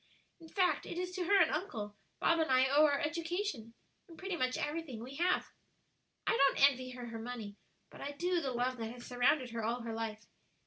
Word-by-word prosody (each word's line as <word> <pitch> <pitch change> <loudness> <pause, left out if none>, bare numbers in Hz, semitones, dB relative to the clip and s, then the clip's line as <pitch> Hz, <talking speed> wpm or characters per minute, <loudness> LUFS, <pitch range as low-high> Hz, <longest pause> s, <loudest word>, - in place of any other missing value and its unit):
In 325 -1 -13
fact, 370 0 +1
it - - -5
is 360 0 -2
to 365 -1 -2
her 400 +3 +5
and - - +5
uncle, 210 - -3 0.2
Bob 335 - +3
and 320 - +1
I 260 0 +5
owe 290 +3 +6
our 285 -1 +1
education, 330 - -2 0.3
and 335 -3 -13
pretty 380 -1 -3
much 255 -5 0
everything 295 -7 -3
we 265 +3 -8
have. 360 +2 +1 0.7
"I - - +3
don't 275 -5 +6
envy 255 -1 -7
her 250 -1 -7
her 230 -1 -6
money, 225 -3 -6 0.4
but - - -12
I 285 - -4
do 350 +3 0
the 275 - -1
love 250 +1 0
that 225 -1 -4
has 240 0 -10
surrounded 245 +1 +2
her 230 -1 -3
all 235 +3 -1
her 230 -1 -4
life. 225 -1 -4
265 Hz, 215 wpm, -34 LUFS, 235-335 Hz, 0.7 s, owe